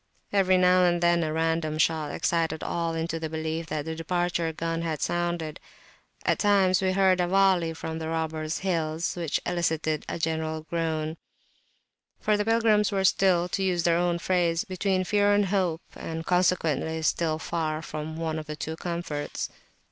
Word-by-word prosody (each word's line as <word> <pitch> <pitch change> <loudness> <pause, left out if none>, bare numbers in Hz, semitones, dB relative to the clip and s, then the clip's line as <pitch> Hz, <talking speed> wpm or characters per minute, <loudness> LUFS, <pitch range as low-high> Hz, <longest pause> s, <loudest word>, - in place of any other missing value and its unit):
Every 190 -2 +4
now 180 0 +5
and 175 -1 +3
then 170 0 +3
a 155 - -1
random 160 -1 0
shot 155 -1 +1
excited 165 -2 0
all 165 -1 -2
into 165 0 -2
the 160 -1 -4
belief 160 +1 -3
that 150 -2 -3
the 160 - -3
departure 170 0 -1
gun 165 +1 -3
had 160 -3 -2
sounded. 170 -3 -2 0.7
At - - +2
times 195 -3 +3
we 185 -1 +1
heard 190 -1 +3
a 175 - +1
volley 185 -3 +3
from 160 0 -5
the 160 - -4
robbers 160 -1 -2
hills, 165 -2 -1
which 170 -4 -1
elicited 160 -3 0
a - - -3
general 160 -1 -2
groan, 160 -1 -2 1.0
for 210 - +2
the 210 - +1
pilgrims 220 -2 +3
were 195 -1 0
still, 185 -2 +3
to 195 - -2
use 180 -3 +1
their 170 -1 +3
own 175 0 +1
phrase, 170 -1 +1
between 190 -2 0
fear 205 +2 +2
[p.55] 205 - +5
and 205 0 +3
hope, 180 -5 0
and, 165 0 -5
consequently, 160 -3 +1
still 155 0 +1
far 160 -1 -2
from 155 0 -5
one 160 -1 -2
of 155 - -8
the 150 - -5
two 155 +3 -4
comforts. 170 -4 -4
165 Hz, 175 wpm, -27 LUFS, 160-180 Hz, 1.0 s, now